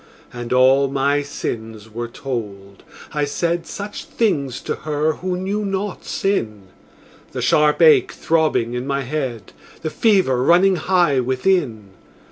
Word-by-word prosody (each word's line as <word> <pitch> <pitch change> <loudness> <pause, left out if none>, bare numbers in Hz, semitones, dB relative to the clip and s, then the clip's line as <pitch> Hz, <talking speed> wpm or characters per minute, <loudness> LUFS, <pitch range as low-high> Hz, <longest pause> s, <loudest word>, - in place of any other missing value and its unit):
And 120 -1 -7
all 130 +2 +5
my 140 +1 +1
sins 110 -6 -6
were 120 +2 -5
told; 105 -6 -6 0.3
I 150 -1 0
said 170 +4 -1
Such 205 0 -7
things 140 - -1
to - - -4
her 155 +1 -1
who 180 0 -3
knew 200 +3 -2
not 195 0 -3
sin 110 - -2 0.6
The - - -3
sharp 150 +2 +3
ache 155 -2 +6
throbbing 155 -8 0
in 125 +2 -4
my 140 0 -1
head, 130 -7 -4 0.3
The 155 - -2
fever 190 - +2
running 180 +6 +4
high 170 -5 +2
within. 130 - 0
140 Hz, 135 wpm, -20 LUFS, 120-175 Hz, 0.6 s, ache